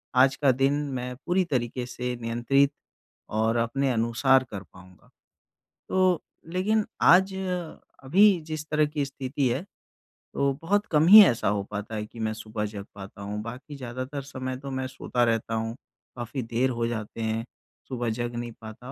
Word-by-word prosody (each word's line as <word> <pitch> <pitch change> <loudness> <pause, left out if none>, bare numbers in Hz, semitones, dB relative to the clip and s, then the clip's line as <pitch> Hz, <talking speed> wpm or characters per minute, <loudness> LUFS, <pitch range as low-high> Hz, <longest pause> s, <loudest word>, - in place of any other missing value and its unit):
आज 135 +1 +5
का 135 -1 +3
दिन 135 +2 +2 0.2
मैं 125 0 -4
पूरी 185 +1 +2
तरीके 125 -4 -2
से 125 0 -4
नियंत्रित 120 +5 +2 0.7
और 110 +1 +2
अपने 130 +4 +1
अनुसार 120 +3 +3
कर 100 -3 -6
पाऊँगा, 90 +1 -18 0.8
तो 185 -3 +2 0.3
लेकिन 210 +3 +2 0.2
आज 190 +1 +6 0.7
अभी 190 +5 +5
जिस 155 -1 -5
तरह 150 0 +3
की 150 -1 -2
स्थिति 135 0 -2
है 125 +7 -1 0.7
तो 140 0 +1
बहुत 205 +5 +1
कम 155 0 +4
ही 215 +4 +12
ऐसा 115 - +1
हो 100 0 +1
पाता 105 +1 -5
है 105 0 -3
कि 115 - -13
मैं 110 -1 -1
सुबह 110 -1 -4
जग 100 -1 -6
पाता 100 0 -10
हूँ। 105 +1 -4
बाकी 125 +6 -8
ज़्यादातर 130 +2 -5
समय 130 -1 -5
तो 135 +1 -7
मैं 130 0 -2
सोता 125 -1 -1
रहता 115 -1 0
हूँ, 115 +1 -2 0.4
काफ़ी 120 +2 -4
देर 115 +3 0
हो 115 -2 -1
जाते 115 -1 -5
हैं। 110 +1 -1 0.4
सुबह 120 -3 -2
जग 120 +1 -3
नहीं 120 0 -4
पाता 110 +3 -9
125 Hz, 170 wpm, -26 LUFS, 115-140 Hz, 0.8 s, ही